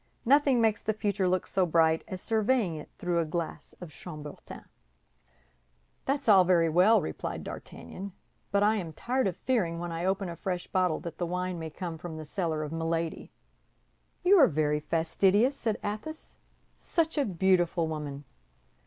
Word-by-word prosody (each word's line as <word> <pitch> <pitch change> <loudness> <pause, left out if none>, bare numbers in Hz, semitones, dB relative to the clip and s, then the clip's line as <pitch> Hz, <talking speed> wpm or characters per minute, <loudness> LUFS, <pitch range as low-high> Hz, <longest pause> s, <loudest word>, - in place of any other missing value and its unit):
Nothing 275 0 +4
makes 220 -2 +2
the 220 - -1
future 200 -3 0
look 185 0 +1
so 190 - +1
bright 160 -1 +3
as 185 -3 -6
surveying 220 -4 +1
it 150 - -8
through 175 -1 0
a - - +2
glass 165 +1 -5
of 175 -3 -9
chambertin." 150 -3 -9 1.4
"That's 275 -1 -1
all 195 -4 +8
very 170 -2 +3
well," 185 +5 +5
replied - - -4
D'Artagnan; 195 - -8 0.4
"but 200 0 +2
I 215 +1 +3
am 170 -5 -5
tired 255 - 0
of 180 - -3
fearing 190 -11 0
when 175 0 -4
I 165 +1 -3
open 195 +1 0
a 170 - -5
fresh 180 0 -3
bottle 180 -4 +1
that 170 - -7
the 175 - -1
wine 180 0 -2
may 160 -1 -5
come 165 0 -6
from 160 -1 -7
the 155 - -7
cellar 160 -2 -2
of 150 - -5
Milady." 165 0 -2 0.9
"You 380 +2 +6
are 280 - +8
very 150 -1 +1
fastidious," 190 - +2
said 225 -5 -1
Athos; 215 +10 -6 0.4
"such 325 -1 -1
a - - +3
beautiful 180 -4 +2
woman!" 150 -3 -5
180 Hz, 170 wpm, -29 LUFS, 165-210 Hz, 1.4 s, all